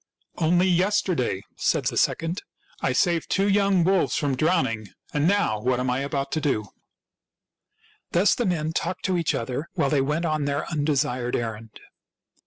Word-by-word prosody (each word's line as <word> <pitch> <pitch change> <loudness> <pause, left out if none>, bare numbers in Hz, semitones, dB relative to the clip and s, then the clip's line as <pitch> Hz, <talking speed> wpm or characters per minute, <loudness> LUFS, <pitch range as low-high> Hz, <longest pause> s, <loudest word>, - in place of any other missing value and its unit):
" - - -58
Only 175 +2 +3
yesterday," 180 - +1
said - - +1
the - - 0
second, 165 +3 0 0.2
" - - -29
I 130 - +1
saved 165 +5 +1
two 195 +1 +2
young 200 -3 +3
wolves 190 +1 +2
from 145 -3 0
drowning. 125 - +1 0.3
And 150 +1 +2
now 195 - +2
what 125 +2 +1
am 125 0 0
I 125 - 0
about 140 0 -2
to 155 - -1
do? 110 -9 -1 0.7
" - - -38
Thus 185 +4 +4
the 240 - -1
men 160 -3 -1
talked 185 - -3
to 185 - +1
each 165 - 0
other 130 +7 -3
while 155 -7 0
they 145 -3 +3
went 150 +5 -1
on 155 -3 0
their 140 0 -2
undesired 145 -5 0
errand. 110 -1 -5
150 Hz, 180 wpm, -25 LUFS, 130-175 Hz, 0.7 s, Thus